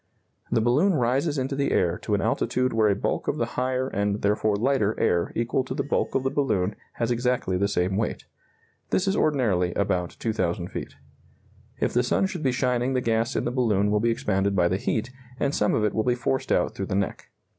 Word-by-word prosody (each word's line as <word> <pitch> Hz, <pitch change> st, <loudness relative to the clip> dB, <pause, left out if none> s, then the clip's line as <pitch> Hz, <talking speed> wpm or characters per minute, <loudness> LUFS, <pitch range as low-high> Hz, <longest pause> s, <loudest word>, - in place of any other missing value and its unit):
The 115 Hz, -, +3 dB
balloon 145 Hz, -, +3 dB
rises 135 Hz, +4 st, +1 dB
into 135 Hz, +1 st, -1 dB
the 140 Hz, 0 st, 0 dB
air 90 Hz, -1 st, +1 dB
to -, -, -1 dB
an -, -, 0 dB
altitude 130 Hz, 0 st, 0 dB
where 110 Hz, -1 st, +3 dB
a 100 Hz, -, +2 dB
bulk -, -, -2 dB
of -, -, 0 dB
the -, -, +1 dB
higher 130 Hz, 0 st, 0 dB
and 100 Hz, -3 st, -1 dB
therefore 105 Hz, +1 st, +2 dB
lighter 110 Hz, -1 st, +1 dB
air 85 Hz, -1 st, +1 dB
equal 120 Hz, +3 st, 0 dB
to -, -, -5 dB
the -, -, -1 dB
bulk 145 Hz, -, -1 dB
of 135 Hz, -, +1 dB
the 135 Hz, -, 0 dB
balloon 105 Hz, -9 st, 0 dB, 0.2 s
has 115 Hz, +1 st, -1 dB
exactly 120 Hz, -5 st, 0 dB
the 100 Hz, +2 st, +1 dB
same 95 Hz, -1 st, 0 dB
weight. 110 Hz, -, -2 dB, 0.6 s
This 190 Hz, -, +1 dB
is 195 Hz, -, +2 dB
ordinarily 105 Hz, -, +1 dB
about 90 Hz, -3 st, -1 dB
2,000 90 Hz, -6 st, -1 dB
feet. -, -, -6 dB, 0.8 s
If -, -, 0 dB
the 120 Hz, -, +3 dB
sun 125 Hz, +9 st, +1 dB
should 180 Hz, -3 st, -4 dB
be 135 Hz, -4 st, +2 dB
shining 125 Hz, +1 st, 0 dB
the 130 Hz, -, +2 dB
gas 115 Hz, 0 st, 0 dB
in -, -, 0 dB
the 120 Hz, -, 0 dB
balloon 105 Hz, -5 st, +1 dB
will 105 Hz, -, +2 dB
be 115 Hz, +2 st, +1 dB
expanded 100 Hz, -3 st, 0 dB
by 90 Hz, -2 st, +3 dB
the 95 Hz, -, +1 dB
heat, 110 Hz, +4 st, -2 dB, 0.3 s
and 140 Hz, -, 0 dB
some 105 Hz, -, +2 dB
of 110 Hz, -, +1 dB
it 105 Hz, -, 0 dB
will 110 Hz, -, +1 dB
be 125 Hz, +1 st, +2 dB
forced 130 Hz, +2 st, -2 dB
out -, -, +2 dB
through 95 Hz, -, -4 dB
the 100 Hz, -, -2 dB
neck. 100 Hz, -1 st, -2 dB
115 Hz, 220 wpm, -25 LUFS, 100-130 Hz, 0.8 s, The